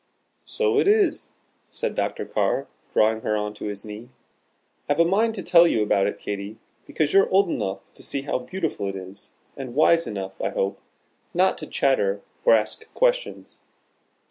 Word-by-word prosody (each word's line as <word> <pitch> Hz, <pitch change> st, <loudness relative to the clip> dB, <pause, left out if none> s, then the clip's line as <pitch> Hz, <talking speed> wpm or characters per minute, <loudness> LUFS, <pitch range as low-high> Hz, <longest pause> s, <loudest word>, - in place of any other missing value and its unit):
"So 435 Hz, -2 st, +1 dB
it -, -, +2 dB
is," 410 Hz, -5 st, +2 dB, 0.4 s
said -, -, -3 dB
Dr. -, -, -2 dB
Carr, -, -, 0 dB, 0.3 s
drawing 110 Hz, +1 st, +2 dB
her 105 Hz, -1 st, 0 dB
on 105 Hz, 0 st, -3 dB
to 105 Hz, -, -8 dB
his 105 Hz, 0 st, -5 dB
knee. 110 Hz, +3 st, -9 dB, 0.8 s
"I've 145 Hz, +2 st, +1 dB
a 170 Hz, -, +6 dB
mind 220 Hz, +6 st, +2 dB
to 190 Hz, -, -5 dB
tell 170 Hz, -1 st, +6 dB
you 110 Hz, -9 st, +2 dB
about 100 Hz, -1 st, +2 dB
it, -, -, -3 dB
Katy, 100 Hz, +1 st, -6 dB, 0.3 s
because 155 Hz, -1 st, -1 dB
you're 195 Hz, 0 st, +5 dB
old 195 Hz, -2 st, +3 dB
enough 95 Hz, -, -4 dB
to -, -, -11 dB
see 140 Hz, -, -3 dB
how 140 Hz, -, -1 dB
beautiful 150 Hz, -, -3 dB
it 100 Hz, -, -5 dB
is, 95 Hz, +1 st, -10 dB, 0.2 s
and 130 Hz, -3 st, -7 dB
wise 165 Hz, +2 st, +4 dB
enough 95 Hz, -2 st, -6 dB
(I -, -, 0 dB
hope) 95 Hz, -, -2 dB, 0.6 s
not 185 Hz, +2 st, +3 dB
to 155 Hz, -, -7 dB
chatter 100 Hz, -8 st, +1 dB, 0.2 s
or -, -, +6 dB
ask 110 Hz, -, -2 dB
questions. -, -, -1 dB
135 Hz, 175 wpm, -24 LUFS, -, 0.8 s, a